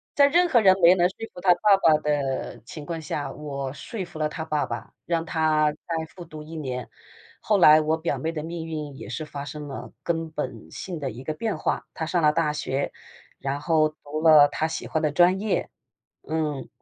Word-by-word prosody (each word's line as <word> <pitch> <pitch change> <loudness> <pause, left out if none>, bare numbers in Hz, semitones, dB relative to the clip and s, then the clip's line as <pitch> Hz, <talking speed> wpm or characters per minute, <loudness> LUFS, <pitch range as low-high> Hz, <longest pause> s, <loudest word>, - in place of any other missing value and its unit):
在 280 -2 +6
任 350 +5 +4
何 250 -9 +4
人 190 -2 +6
没 175 +2 +8
能 175 -1 +3
说 185 - -16 0.2
服 180 - -10
她 180 -1 +6
爸 205 +2 +5
爸 155 -2 +6
的 140 -5 -2
情 150 +4 -9
况 165 +1 -4
下， 150 -1 -3
我 140 -3 -5
说 195 +5 -6
服 165 -2 -11
了 155 0 +1
她 160 +1 -5
爸 150 -2 0
爸， - - -7
让 165 -1 -1
她 155 -2 +2
再 160 +1 -4
复 180 - -8
读 155 -2 -10
1 160 +2 -10
年。 130 -5 -4 0.5
后 210 - +3
来 155 -4 +8
我 155 +1 +1
表 165 +1 -2
妹 160 - -2
的 155 -2 -5
命 165 0 -5
运 150 -3 -5
也 - - -9
是 155 - -4
发 140 -2 -7
生 150 0 -7
了 135 - -7
根 165 -1 -1
本 130 -8 -6
性 180 -4 -6
的 140 -3 -3
一 125 +3 -9
个 155 - -3
变 215 +6 -2
化， - - -2
她 160 - -3
上 170 +2 0
了 150 -1 +5
大 150 -1 +1
学， 140 -2 -2 0.5
然 140 +1 -2
后 155 0 +2
读 155 0 -7
了 155 -3 +8
她 155 +2 -1
喜 160 - -5
欢 160 - -1
的 150 -2 +1
专 180 +4 +4
业， 210 -1 -1 0.6
嗯， 155 -3 -2
155 Hz, 230 characters per minute, -25 LUFS, 150-170 Hz, 0.6 s, 没